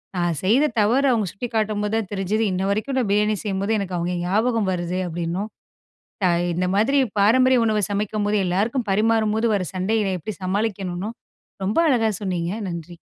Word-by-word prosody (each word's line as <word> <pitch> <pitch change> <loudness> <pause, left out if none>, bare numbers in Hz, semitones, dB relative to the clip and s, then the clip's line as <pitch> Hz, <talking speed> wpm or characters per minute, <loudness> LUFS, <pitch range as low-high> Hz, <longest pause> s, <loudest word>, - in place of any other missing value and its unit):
நான் 175 -3 0
செய்த 235 +10 +4
தவறு 245 +7 +3
அவுங்க 220 -4 +1
சுட்டிக்காட்டும் 215 -1 -2
போது 210 +1 -2
தான் 215 -4 -3
தெரிஞ்சது, 200 +3 0
இன்னவரைக்கும் 200 +8 -1
நான் 230 - -1
பிரியாணி 210 +1 +2
செய்யும்போது 200 +1 -1
எனக்கு 190 -2 -3
அவுங்க 175 +1 -2
ஞாபகம் 215 +2 +1
வருது 180 0 -2
அப்பிடின்னும். 175 +5 -3 0.7
த - - +4 0.3
இந்த 180 +2 0
மாதிரி 230 +8 +3 0.2
பாரம்பரிய 255 +5 +5
உணவ 215 -1 +1
சமைக்கும்போது 210 +1 0
எல்லாருக்கும் 215 +7 0
பரிமாறும்போது 220 +2 +2
வர 200 -3 +1
சண்டையினை 195 +2 0
எப்பிடி 200 +5 -6
சமாளிக்கணுனு 195 -1 -2 0.5
ரொம்ப 195 +3 -1
அழகா 225 -5 +2
சொன்னீங்க. 175 -2 -2 0.2
நன்றி. 170 0 -7
205 Hz, 150 wpm, -22 LUFS, 185-220 Hz, 0.7 s, பாரம்பரிய